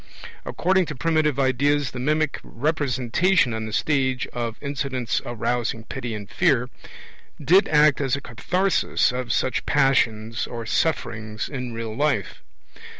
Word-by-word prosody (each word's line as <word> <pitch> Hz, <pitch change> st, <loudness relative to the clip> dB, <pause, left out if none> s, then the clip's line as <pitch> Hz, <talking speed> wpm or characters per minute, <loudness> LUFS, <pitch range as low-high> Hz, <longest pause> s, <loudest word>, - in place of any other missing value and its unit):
According 185 Hz, 0 st, +1 dB
to 150 Hz, -, -5 dB
primitive 155 Hz, 0 st, +1 dB
ideas, 140 Hz, +2 st, +2 dB
the 125 Hz, -, -6 dB
mimic 150 Hz, +2 st, 0 dB
representation 140 Hz, +2 st, +1 dB
on 110 Hz, 0 st, -3 dB
the -, -, -6 dB
stage 130 Hz, +4 st, 0 dB
of 115 Hz, -2 st, -3 dB
'incidents 135 Hz, -4 st, -2 dB
arousing 120 Hz, -1 st, -2 dB
pity 120 Hz, -2 st, -5 dB
and 105 Hz, -2 st, -7 dB
fear' 130 Hz, -, +1 dB, 0.7 s
did 175 Hz, +8 st, +4 dB
act 150 Hz, -1 st, +4 dB
as 135 Hz, -1 st, +1 dB
a 140 Hz, -, -6 dB
katharsis 180 Hz, +10 st, +1 dB
of 125 Hz, -1 st, -3 dB
such 130 Hz, +1 st, 0 dB
'passions' 115 Hz, -5 st, +1 dB
or 115 Hz, -1 st, -6 dB
'sufferings' 110 Hz, -6 st, -1 dB
in 125 Hz, -4 st, -5 dB
real 115 Hz, -1 st, -5 dB
life. 140 Hz, -, -1 dB
130 Hz, 135 wpm, -23 LUFS, 115-150 Hz, 0.7 s, did